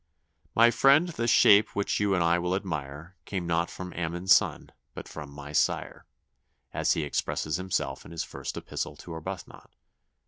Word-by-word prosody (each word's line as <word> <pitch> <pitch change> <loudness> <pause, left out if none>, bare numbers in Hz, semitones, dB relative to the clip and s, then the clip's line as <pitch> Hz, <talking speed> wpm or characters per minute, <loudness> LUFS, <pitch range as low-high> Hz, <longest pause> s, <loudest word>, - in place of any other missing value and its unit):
'My 115 +1 +6
friend, 140 +8 +4
this 120 -8 -2
shape 105 0 +5
which 100 - 0
you 100 -1 +2
and 90 - +2
I 85 +1 +3
will 90 +1 -1
admire, 80 -2 -5
Came 95 -3 -4
not 85 0 0
from 90 -1 -8
Ammon's 85 +2 +2
son, - - +1 0.2
but - - -8
from 75 -2 -8
my 70 +1 -10
sire,' 75 - -1 0.7
as - - +2
he 80 - -1
expresses 75 +2 -2
himself 95 0 -3
in - - -13
his 85 -1 -4
first - - -7
epistle - - -5
to 85 - -10
Arbuthnot. 80 -1 -8
90 Hz, 170 wpm, -28 LUFS, 80-100 Hz, 0.7 s, My